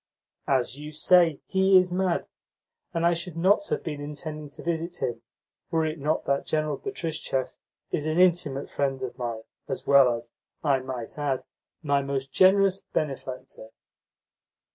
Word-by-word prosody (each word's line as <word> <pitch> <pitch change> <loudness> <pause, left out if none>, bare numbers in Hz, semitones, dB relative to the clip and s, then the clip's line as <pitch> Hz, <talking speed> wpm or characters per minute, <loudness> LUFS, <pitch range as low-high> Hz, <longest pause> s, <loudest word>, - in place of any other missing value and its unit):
"As 130 0 +1
you 150 +1 -7
say, 165 0 +4
he 190 0 +5
is 185 -1 +3
mad, 180 -1 0 0.7
and 165 0 0
I 170 - +5
should 170 0 -5
not 200 +4 +3
have - - -1
been 150 -3 -4
intending 150 +1 -6
to - - -11
visit 170 +1 -2
him, 120 -3 -2 0.5
were 160 -1 +1
it 155 0 -3
not 150 +3 0
that 140 0 0
General 155 -1 0
Betristchev 160 - -3 0.4
is 150 - -1
an 155 +2 +1
intimate 165 -6 +3
friend 135 -2 -1
of 125 -1 -4
mine, 115 -2 -3 0.2
as 135 - -4
well 140 -3 +6
as, 115 0 -9 0.3
I 140 -3 +3
might 130 0 -6
add, 140 -3 -1 0.4
my 140 -2 +2
most 135 -1 -3
generous 195 0 +5
benefactor." 130 -5 -5
150 Hz, 155 wpm, -26 LUFS, 135-170 Hz, 0.7 s, well